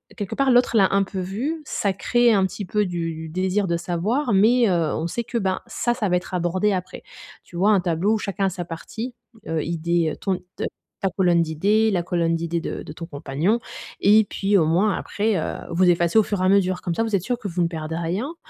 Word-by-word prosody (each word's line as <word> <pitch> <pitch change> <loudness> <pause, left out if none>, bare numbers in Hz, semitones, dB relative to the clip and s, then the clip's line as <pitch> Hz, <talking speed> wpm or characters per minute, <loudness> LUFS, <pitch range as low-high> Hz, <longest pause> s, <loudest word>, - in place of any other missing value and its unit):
quelque 205 -4 -4
part, 275 -1 +2
l'autre 245 -1 +3
l'a 195 -3 +5
un 195 - +4
peu 190 0 -5
vu. 240 - -3
Ça 200 -8 -1
crée 240 +4 +3
un 195 -2 +3
petit 195 +2 -5
peu 210 +3 0
du 170 -2 -3
du 160 0 -7
désir 190 +4 0
de 170 - 0
savoir, 205 - -1
mais 225 +4 +4
heu, 170 -4 +1
on 160 - -2
sait 235 +7 -3
que 235 - -3
ben, 190 -3 0
ça, 240 - -1
ça 230 -4 -1
va 180 - +2
être 180 +1 -3
abordé 180 +3 +1
après. 185 -2 -4 0.4
Tu 175 - -16
vois? 200 +4 +4
Un 195 -3 +4
tableau 175 +4 +1
où - - +2
chacun 200 -1 -2
a 195 - +2
sa 180 -1 -5
partie, 220 +9 -6 0.3
heu, 160 -1 -1
idée, 170 0 0
heu, - - -5
ton 190 -2 -1 0.2
te - - -5 0.4
ta 195 - +1
colonne 175 -3 +3
d'idées, 200 +8 +2
la 180 -3 0
colonne 170 -1 0
d'idées 170 0 -2
de - - -5
de - - -9
ton 165 +2 -7
compagnon 155 +9 -1 0.4
et 210 +2 +6
puis 200 +1 +1
au 165 - +3
moins 185 +6 +2
après, 210 -1 -1
heu, - - -3 0.2
vous 180 +2 +3
effacez 170 +4 +3
au - - +4
fur 205 -2 -2
et - - +2
à 185 - +4
mesure 185 -2 +2
comme 175 - -2
ça, 225 - 0
vous 220 -2 0
êtes 190 - +1
sûr 245 +3 -2
que 210 - -5
vous 175 -1 -2
ne 170 - +2
perdez 160 -1 -5
rien 185 - -3
185 Hz, 245 wpm, -23 LUFS, 170-210 Hz, 0.4 s, et